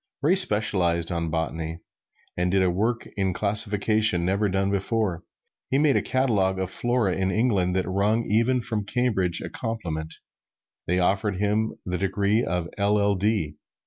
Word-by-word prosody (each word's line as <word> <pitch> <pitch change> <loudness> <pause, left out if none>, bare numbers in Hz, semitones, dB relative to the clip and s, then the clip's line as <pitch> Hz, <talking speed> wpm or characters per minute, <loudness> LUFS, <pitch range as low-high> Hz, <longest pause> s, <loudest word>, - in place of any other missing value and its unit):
Ray 160 +5 +4
specialized 95 - +3
on 85 -1 -2
botany, 80 0 -3 0.6
and 90 +1 0
did 95 +1 +2
a 90 - +2
work 110 +6 -1
in 95 -2 0
classification 105 -1 +2
never 100 +3 0
done 95 +1 0
before. 100 -3 -1 0.5
He 135 - +1
made 145 -1 +3
a - - +2
catalog 105 -8 0
of 95 -1 -3
the - - -13
flora 120 -5 0
of - - -4
England 95 -4 +1
that 95 - -1
wrung 105 +5 0
even 115 +4 +1
from 110 -3 -3
Cambridge 100 -6 0
a - - -6
compliment 80 -9 -5 0.7
they 90 - +1
offered 95 +2 0
him 105 +3 -1
the 90 -1 -3
degree 100 +4 0
of 85 0 -2
LL.D. 100 -5 0
100 Hz, 155 wpm, -24 LUFS, 90-110 Hz, 0.7 s, Ray